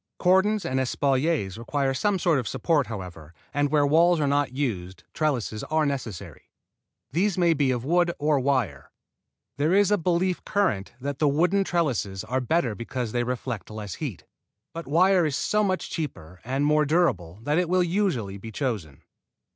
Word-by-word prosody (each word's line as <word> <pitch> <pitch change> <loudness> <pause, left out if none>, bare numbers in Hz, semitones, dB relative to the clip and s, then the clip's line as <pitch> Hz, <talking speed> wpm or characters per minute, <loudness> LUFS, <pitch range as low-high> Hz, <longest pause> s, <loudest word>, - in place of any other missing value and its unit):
Cordons 190 +2 +3
and 130 -5 0
espaliers 130 - 0
require 135 +3 -1
some 195 +9 +1
sort 170 -5 +2
of 125 - -4
support, 155 -5 +1
however, 90 -6 -8 0.2
and 145 0 +1
where 145 -1 +3
walls 165 +4 +4
are 150 - +1
not 140 -1 +1
used 95 -10 -3
trellises 125 -8 -1
are 155 0 +1
necessary. 130 - -5 0.6
These 190 +6 +1
may 170 -2 +4
be 140 -3 +1
of 125 -1 -1
wood 175 +3 +2
or 150 -1 +2
wire. 125 - -1 0.7
There 155 +6 +2
is 205 0 +4
a 205 - +3
belief 180 +2 0
current 185 - 0
that 140 +1 -4
the 150 - +3
wooden 180 +7 +2
trellises 130 - -1
are 130 +1 -1
better 125 -2 +1
because 115 +1 -4
they 120 +1 0
reflect 125 -3 -4
less 105 -3 -6
heat, 135 - -6 0.5
but 165 0 -7
wire 180 +5 +4
is 150 -4 0
so 210 0 +1
much 185 -2 -1
cheaper 95 - -6
and 135 +4 -1
more 150 0 +3
durable 120 - +1
that 150 +5 +1
it 180 -2 0
will 180 0 +3
usually 165 - -1
be 110 +3 -8
chosen. 105 - -4
145 Hz, 170 wpm, -25 LUFS, 115-170 Hz, 0.7 s, walls